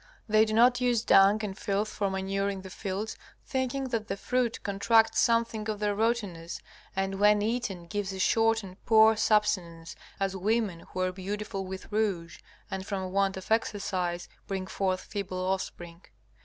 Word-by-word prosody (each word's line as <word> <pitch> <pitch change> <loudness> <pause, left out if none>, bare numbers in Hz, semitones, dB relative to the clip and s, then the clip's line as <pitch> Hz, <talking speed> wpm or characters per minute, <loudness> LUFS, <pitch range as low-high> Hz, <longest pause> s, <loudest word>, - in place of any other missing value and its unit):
They 215 0 +5
do 215 - -3
not 245 +3 +5
use 240 -3 +2
dung 195 +1 +6
and 195 -2 -5
filth 205 +1 -1
for 200 -1 -1
manuring 195 0 -2
the 190 - -9
fields, 200 +3 -4 0.3
thinking 260 0 -2
that 225 -3 -2
the 195 - -3
fruit 250 +1 -1
contracts 205 +3 +3
something 230 -2 +1
of 215 - -1
their 205 0 0
rottenness, 200 -7 -1 0.4
and 195 0 -1
when 210 0 +5
eaten 210 -6 -2
gives 205 +2 -3
a 190 - -6
short 225 +3 +2
and 185 0 -12
poor 220 0 +7
subsistence, 195 -7 0 0.2
as 195 -1 -1
women 205 -2 0
who 185 - -4
are 185 0 +1
beautiful 195 +1 -4
with 190 +3 -8
rouge 195 -6 -1 0.3
and 190 0 -4
from 190 -2 -3
want 195 0 +1
of 190 - -9
exercise 185 -5 -1 0.2
bring 190 -1 -3
forth 190 -1 -1
feeble 195 -3 -5
offspring. 185 -2 -3
200 Hz, 165 wpm, -29 LUFS, 190-220 Hz, 0.4 s, poor